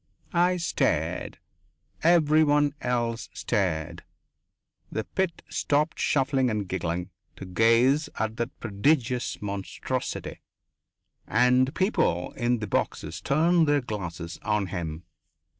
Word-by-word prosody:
I 180 +1 +3
stared. 165 - -1 0.6
Everyone 155 -3 +4
else 120 -2 -1
stared. 85 -6 -1 0.9
The 110 - -2
pit 190 - -2
stopped 150 +2 0
shuffling 135 -2 +2
and 105 -3 -2
giggling 90 0 -3 0.2
to - - -8
gaze 115 +9 +3
at 110 0 -2
that 120 +2 -4
prodigious 125 +3 0
monstrosity, 100 -1 -4 0.9
and 125 +2 +3
people 185 - +1
in 120 +1 0
the 110 -2 -4
boxes 85 +2 -2
turned 160 - +3
their 145 -1 +3
glasses 90 -7 -6
on 105 -2 0
him. 85 -2 -4
120 Hz, 105 wpm, -26 LUFS, 100-145 Hz, 0.9 s, Everyone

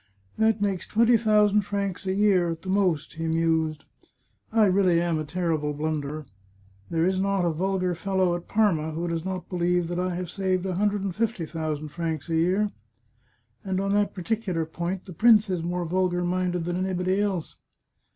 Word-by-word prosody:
" 95 0 -36
That 220 -1 +3
makes 195 -3 -1
twenty 230 +2 +4
thousand 210 -2 +4
francs 200 -1 -3
a 190 - +1
year 195 -4 +3
at 165 -1 -5
the 190 - -6
most," 185 -6 +1
he 165 +1 -4
mused. 160 -1 0 0.4
*' - - -42 0.3
I 220 -1 +4
really 185 -3 +3
am 170 -2 0
a - - -2
terrible 160 -3 -1
blunderer. 150 0 -3 0.6
There 165 0 +1
is 185 0 +1
not 195 -1 +1
a 170 - +2
vulgar 185 +2 0
fellow 185 0 0
at 175 - -7
Parma 165 -8 +1
who 170 +2 -3
does 165 -1 -2
not 185 -1 -4
believe 175 -1 0
I 180 0 -1
have 180 -1 -4
saved 185 -2 -1
a 190 - -1
hundred 205 +1 0
and 190 -3 -3
fifty 220 -6 -1
thousand 155 -1 -4
francs 160 -1 -4
a 165 - 0
year. 185 +6 +2 0.9
And 190 -1 -1
on 195 0 0
that 205 0 +1
particular 185 -3 -2
point 175 +3 -4
the 185 - -9
prince 215 0 +5
is 180 -2 -1
more 175 +1 -2
vulgar 180 +1 0
minded 180 -1 -1
than 175 +1 -1
anybody 185 +1 0
else. 190 -6 -2
180 Hz, 190 wpm, -26 LUFS, 165-195 Hz, 0.9 s, prince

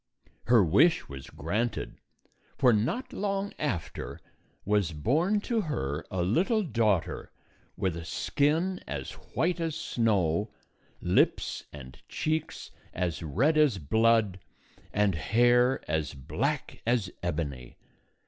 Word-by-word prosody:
" - - -32
Her 115 -3 +6
.wish 155 - +4
was 70 -1 -9
granted, 105 +8 -3 0.6
for 125 -3 +5
not 125 - -1
long 200 0 -2
after 100 - -3 0.5
was 100 -4 +1
born 160 - +1
to 230 +1 0
her 75 - -3
a 90 -1 -1
little 190 - +2
daughter 110 - 0 0.5
with 95 -3 0
a 85 - -6
skin 155 - 0
as 70 -3 -4
white 175 +1 -2
as 165 -2 -2
snow, 105 - +1 0.5
lips - - +1
and 65 -3 -11
cheeks 155 0 -2 0.2
as 90 -2 -2
red 130 - +2
as 145 -9 +4
blood, 110 +3 +2 0.5
and 105 -1 +2
hair 120 +8 +3
as 80 -3 -1
black 65 -1 -3
as 115 -6 +1
ebony. 75 -8 -4
110 Hz, 120 wpm, -29 LUFS, -, 0.6 s, Her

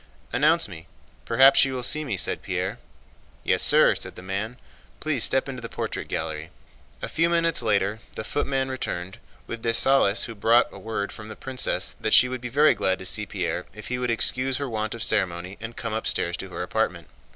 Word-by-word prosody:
"Announce - - +3
me. 80 - -11 0.4
Perhaps 135 +1 +6
she 135 - +5
will 130 -2 -4
see 155 +5 +2
me," 125 -10 -3
said - - 0
Pierre. - - -3 0.6
"Yes, - - +2
sir," - - +5
said - - -5
the 90 - -10
man. 105 +6 -4 0.4
"Please 150 -6 +1
step 135 - +2
into 130 -2 -6
the 115 - -6
portrait - - -5
gallery." 80 0 -4 0.5
A - - -2
few 165 +1 +1
minutes 165 -3 +2
later 105 -1 +1 0.2
the - - -4
footman 135 +2 -1
returned 95 -7 -4 0.3
with 115 -1 -6
Dessalles, 115 -2 +4
who 115 - -4
brought 115 +3 +3
word 110 -2 -4
from 110 - -10
the 110 - -8
princess 130 -1 0
that 110 - +4
she 125 - +7
would 130 -1 -5
be 125 - -5
very 145 +5 +4
glad 95 0 0
to 95 - -9
see 105 +3 0
Pierre 90 -2 -3
if 105 - -9
he 125 0 -2
would 125 -1 -1
excuse 130 +3 +1
her 140 - -3
want 110 -2 -3
of 115 - -5
ceremony 90 -2 -1
and 115 +1 -8
come 115 -2 -4
upstairs 110 - -1
to - - -7
her - - -5
apartment. - - -2
115 Hz, 200 wpm, -25 LUFS, 100-130 Hz, 0.6 s, she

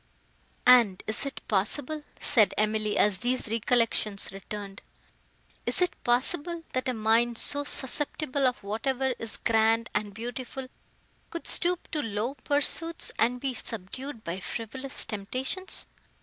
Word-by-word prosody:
"And 240 -7 +6
is 220 +6 0
it 275 - -8
possible," 255 +9 0 0.2
said 230 -8 +4
Emily, 215 0 +1
as 205 -3 +3
these 250 0 -1
recollections 225 -2 +1
returned—"is 200 - -8
it 360 -1 +2
possible, 325 +7 +1
that 255 0 -1
a - - 0
mind, 225 +2 +2
so 285 +4 +7
susceptible 280 0 +1
of 250 -4 -2
whatever 255 +6 -1
is 225 -1 -5
grand 225 0 +2
and 210 -1 -1
beautiful, 245 +4 -6 0.6
could 335 - -7
stoop 355 0 +1
to 305 - -1
low 225 +1 -2
pursuits, 295 +4 +1
and 245 +2 +2
be 270 0 -2
subdued 230 +3 -6
by 170 +3 -4
frivolous 260 +7 -4
temptations?" 255 - -3
240 Hz, 125 wpm, -28 LUFS, 215-275 Hz, 0.6 s, so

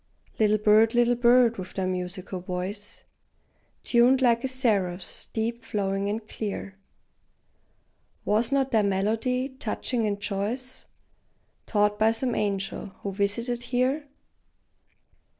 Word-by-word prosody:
Little 215 -1 +4
bird, 215 +2 +4
little 240 0 +4
bird, 240 -1 +4
with 185 0 -8
thy 190 - -1
musical 185 0 -4
voice 185 +4 -5 0.8
Tuned 245 +2 +4
like 235 -2 +3
a - - +1
seraph's, 200 -9 -1
deep, 230 +1 -3
flowing, 200 -2 -1
and 215 +1 -4
clear, 200 -2 -5 1.5
Was 220 +4 +2
not 270 -1 +1
thy 220 - +4
melody, 220 +6 0
touching 240 -2 -2
and 200 -1 -2
choice, 220 +6 -4 0.8
Taught 210 -1 +1
by 220 +1 +5
some 245 +2 -1
angel, 200 -1 -2 0.2
who 200 - -2
visited 225 +5 -1
here? 260 +4 0
220 Hz, 115 wpm, -26 LUFS, 200-245 Hz, 1.5 s, by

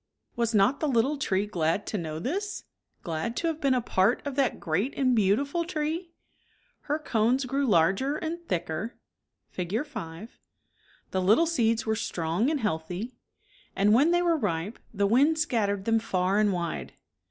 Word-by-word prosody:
Was 235 -1 0
not 210 +8 +4
the 310 - 0
little 265 +2 +2
tree 195 -6 0
glad 175 0 -1
to - - -4
know 155 -2 -4
this? 380 - -3 0.4
glad 170 +8 -3
to - - -1
have 320 -1 -1
been 275 -2 +3
a 250 - +1
part 205 +3 +1
of 285 - -3
that 270 -2 0
great 190 - -1
and 255 -3 +3
beautiful 235 - +2
tree? 330 +1 -3 0.8
Her 295 - +2
cones 255 -2 +1
ijKH. - - -9
g|.g^ 275 -1 +1
larger 195 - +3
and 335 +2 -4
thicker 175 +5 -3 0.6
(Fig. 195 - -2
5), 215 - -8 0.7
the 190 - 0
little 215 - +4
seeds 230 -9 +1
were 220 0 +1
strong 175 - -1
and 305 -3 -1
Healthy, 180 +4 -3 0.6
and 205 +2 +4
when 275 +8 +5
they 350 +1 +3
were 340 -2 +3
ripe, 200 - -2
the 200 -2 0
wind 275 +10 +4
scattered 210 -10 0
them 225 0 +3
far 190 -1 0
and 210 -1 +3
wide. 170 -3 -3
225 Hz, 170 wpm, -27 LUFS, 190-280 Hz, 0.8 s, when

